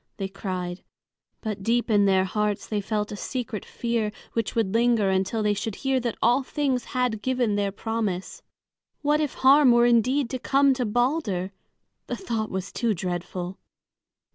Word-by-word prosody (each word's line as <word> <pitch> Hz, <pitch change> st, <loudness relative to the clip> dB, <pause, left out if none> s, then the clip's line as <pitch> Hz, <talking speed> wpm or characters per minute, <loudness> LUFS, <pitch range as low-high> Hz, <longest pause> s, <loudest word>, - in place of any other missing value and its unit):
they 195 Hz, -, -2 dB
cried. 185 Hz, -2 st, -5 dB, 0.6 s
But 215 Hz, -3 st, -4 dB
deep 235 Hz, +3 st, +1 dB
in 205 Hz, -1 st, +5 dB
their 190 Hz, -1 st, +4 dB
hearts 210 Hz, +1 st, -1 dB
they 210 Hz, -2 st, -2 dB
felt 210 Hz, +1 st, -2 dB
a -, -, -4 dB
secret 230 Hz, -1 st, -4 dB
fear 230 Hz, -3 st, -2 dB, 0.2 s
which 230 Hz, -2 st, -2 dB
would 220 Hz, -4 st, +1 dB
linger 230 Hz, -4 st, +3 dB
until 190 Hz, +4 st, 0 dB
they 210 Hz, 0 st, +2 dB
should 205 Hz, +1 st, -3 dB
hear 270 Hz, -1 st, 0 dB
that 235 Hz, -2 st, -3 dB
all 240 Hz, +4 st, +4 dB
things 265 Hz, -2 st, -1 dB
had 250 Hz, -5 st, -1 dB
given 250 Hz, -4 st, +1 dB
their 200 Hz, -1 st, 0 dB
promise. 220 Hz, -, -3 dB, 0.6 s
What 300 Hz, +1 st, +3 dB
if 295 Hz, -4 st, -2 dB
harm 270 Hz, 0 st, +6 dB
were 240 Hz, 0 st, +5 dB
indeed 240 Hz, +3 st, +3 dB
to 255 Hz, -, -3 dB
come 275 Hz, +2 st, +3 dB
to 250 Hz, -3 st, -1 dB
Balder! 215 Hz, -, 0 dB, 0.6 s
The -, -, -2 dB
thought 225 Hz, -, -3 dB
was 190 Hz, 0 st, -4 dB
too 230 Hz, -3 st, 0 dB
dreadful. 180 Hz, +1 st, -4 dB
225 Hz, 165 wpm, -25 LUFS, 195-250 Hz, 0.6 s, harm